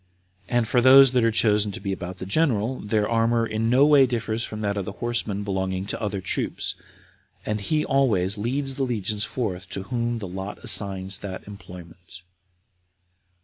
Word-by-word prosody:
And 120 -2 +1
for 120 +2 +2
those 135 +1 +8
that 125 -2 +2
are 115 - +4
chosen 105 -2 +2
to - - -6
be 100 -1 -3
about 90 0 -7
the 95 - -7
general, 125 - 0
their 105 0 0
armor 115 0 +1
no 115 +5 +2
way 145 -3 +6
differs 115 -2 -2
from 110 -1 -6
that 100 -1 -1
of 100 - -2
the 105 - -6
horsemen 115 -3 -2
belonging 95 -1 -2
to - - -5
other 100 -3 -3
troops; 95 - -2 0.7
and 105 -1 -2
he 150 +8 0
always 105 -9 +2
leads 135 +6 -1
the 135 - -2
legions 105 -4 -2
forth 95 -7 -4
to 95 - -5
whom 120 +1 -2
the 105 -4 -6
lot 95 +2 -6
assigns 95 -2 +1
that 95 -1 -8
employment. 90 -3 -12
105 Hz, 175 wpm, -24 LUFS, 95-120 Hz, 0.7 s, those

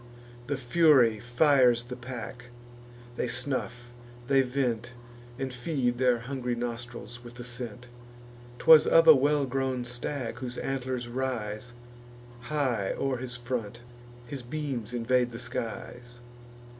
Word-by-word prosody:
The 145 - -1
Fury 130 -4 +4
fires 120 0 +4
the 125 +1 -7
pack; 125 -1 -7 0.7
they - - 0
snuff, 120 -1 -3 0.4
they 135 0 +5
vent, 125 -2 -1 0.4
And 135 -1 -4
feed 125 -2 -1
their 125 -2 +4
hungry 125 -1 -3
nostrils 120 0 -6
with 120 0 -11
the 120 - -8
scent. 120 -1 -6 0.7
'Twas 160 +2 +7
of 165 0 +6
a 160 - +12
well 145 +1 +2
grown 130 -1 -1
stag, 120 0 -4
whose 125 -1 -6
antlers 130 -2 -3
rise 120 -3 -3 0.8
High 130 -10 0
o'er 135 -2 0
his 125 0 -5
front; 120 -2 -4 0.4
his 135 +2 -6
beams 125 -3 -4
invade 125 +1 +1
the 115 - -8
skies. 120 +1 -6
125 Hz, 125 wpm, -28 LUFS, 120-135 Hz, 0.8 s, a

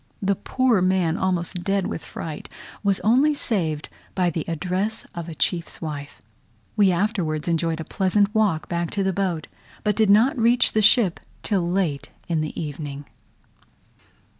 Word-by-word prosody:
The 200 0 +1
poor 250 -1 +1
man, 185 -3 +2
almost 180 -1 -1
dead 195 -1 +1
with - - -4
fright, 155 -2 -7 0.3
was 200 -2 +1
only 270 +7 +4
saved 160 - -1 0.3
by 180 -2 +2
the 160 -1 -2
address 185 +7 -2
of 170 -1 -6
a 160 - -7
chief's 170 +3 -1
wife. 145 -3 -6 0.6
We 200 -3 +5
afterwards 175 -5 -1
enjoyed 165 -1 0
a - - -3
pleasant 200 +2 +1
walk 210 -8 +1
back 170 -1 -2
to 200 - +2
the 190 0 +1
boat, 180 -5 -1 0.4
but 210 -2 +1
did 220 -1 +3
not 230 +8 +5
reach 235 +2 +4
the 215 - +2
ship 210 -4 +4 0.2
till 185 -5 0
late 175 -6 -1 0.2
in 165 -2 0
the 155 - -4
evening. 145 -2 -5
185 Hz, 160 wpm, -23 LUFS, 165-205 Hz, 0.6 s, We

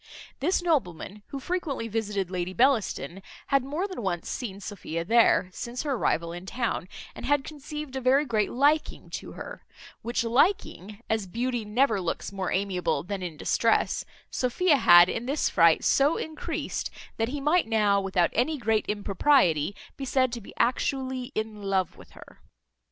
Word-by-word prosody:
This 350 +5 +1
nobleman, 210 - -1
who 280 - -6
frequently 290 -7 -3
visited 205 -4 -2
Lady 180 0 -3
Bellaston, 210 - +1 0.3
had 275 -2 +3
more 305 +9 -2
than 370 -10 -6
once 175 -4 -2
seen 200 -6 -5
Sophia 170 -5 -5
there, 225 -3 +4
since 240 +4 -5
her 295 - -2
arrival 170 -9 0
in 175 +2 -8
town, 230 -5 -2 0.3
and - - -10
had 290 -1 +2
conceived 300 -1 -7
a 265 - -2
very 265 +4 +3
great 215 -5 0
liking 290 +5 +1
to - - -6
her; - - -9 0.4
which 235 +1 -1
liking, 230 - 0
as 220 -3 -1
beauty 240 +4 -2
never 220 -1 +2
looks 175 - -3
more 190 -2 -3
amiable 185 -6 0
than 195 +2 -4
in 170 -4 -5
distress, 225 +8 +1 0.3
Sophia 290 +5 +2
had 175 -7 +8
in 230 +5 -3
this 285 +3 +1
fright 165 -2 +5
so 285 +4 +3
encreased, 315 0 -4 0.3
that 225 +1 0
he 290 +2 -3
might 305 +3 +2
now, 210 -3 +3
without 190 -3 +1
any 275 +7 +1
great 220 -3 0
impropriety, 200 - +2 0.2
be 275 - -4
said 255 -1 +2
to 235 -1 -5
be - - -12
actually 260 +1 0
in 215 -1 -3
love 195 -3 0
with - - -16
her. - - -15
230 Hz, 165 wpm, -27 LUFS, 195-275 Hz, 0.4 s, had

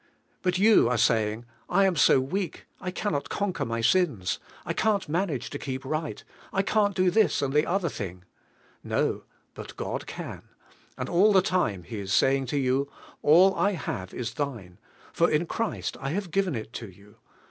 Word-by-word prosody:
Mill 180 -1 +2
you 205 - +5
are 125 - +1
saying. 110 0 +1 0.2
"] - - -37
am 190 0 +3
so 135 -2 +5
weak, 170 +6 -3
I 180 - -4
run 205 - +1
not 140 - -2
conquer 200 -3 -2
my 115 0 -2
sins, 115 - +1 0.3
t - - 0
can'l 215 -2 +2
manage 150 - -2
h. - - -5
keep 130 0 -4
right, 155 +2 -3 0.3
f 195 0 0
can't 205 -2 +2
do 185 -1 +3
this 215 -6 +3
and 135 -1 -1
1 150 - +5
be - - -6
other 190 -1 +1
lliing." 90 - -5 0.6
No, - - -1 0.3
tint - - -9
God - - -4
can; - - -7 0.6
and 125 - -3
all 190 +5 +4
the 190 -3 +5
t 185 - -1
ime 100 - +1
He 110 +4 -6
is 100 -1 -5
saying 135 0 +3
to 145 - -1
you: 135 +1 +1 0.3
"All 180 +6 +6
I 205 +1 +1
have 95 - -4
is 115 -2 -4
thine; 115 -10 -5 0.3
for 170 - +3
in 155 +3 +1
Christ 230 +6 -3
I 135 - -2
have 180 +2 -3
given 190 -4 +1
it 110 +1 -6
to 115 - -6
you. 100 +4 -19
145 Hz, 195 wpm, -27 LUFS, 115-185 Hz, 0.6 s, All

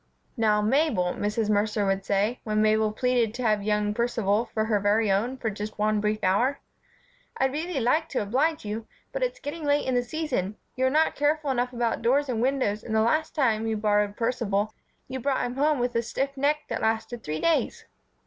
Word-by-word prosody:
"Now, 215 -3 +2
Mabel," 220 - +2
Mrs. 210 +1 -1
Mercer 210 0 +1
would 195 0 0
say, 205 +5 0
when 215 -1 0
Mabel 215 0 +3
pleaded 240 -1 +1
to 250 - -4
have 215 -3 +2
young 210 0 0
Percival 230 -2 +1
for 220 -1 0
her 215 -2 +1
very 205 +1 +2
own 230 +7 0
for 225 -4 -2
just 210 +1 -6
one 210 0 +1
brief 215 +1 -1
hour, 240 +9 +2 0.8
"I'd 265 0 +2
really 315 +1 -2
like 310 +7 +1
to - - -1
oblige 275 +8 0
you, 220 +2 -4 0.2
but - - -4
it's - - -1
getting 315 -1 -6
late 290 0 +2
in 260 - 0
the 245 - +3
season, 245 - -3 0.2
you 260 0 +2
are - - +3
not 310 +4 +2
careful 295 0 +1
enough 250 -1 0
about 235 -2 -1
doors 270 +5 +2
and 230 -3 -1
windows 255 -5 0
and 220 - -3
the 220 - +4
last 310 +8 +1
time 225 -7 +1
you 220 -1 0
borrowed 210 -1 +1
Percival 220 -3 0 0.3
you 260 0 -5
brought 270 +1 0
him 245 - -4
home 300 +1 +3
with 245 0 -1
a 230 - +1
stiff 270 +4 -3
neck 290 +2 +1
that - - -3
lasted 225 +1 -1
three 155 +1 -3
days." 330 -1 0
230 Hz, 205 wpm, -26 LUFS, 210-270 Hz, 0.8 s, the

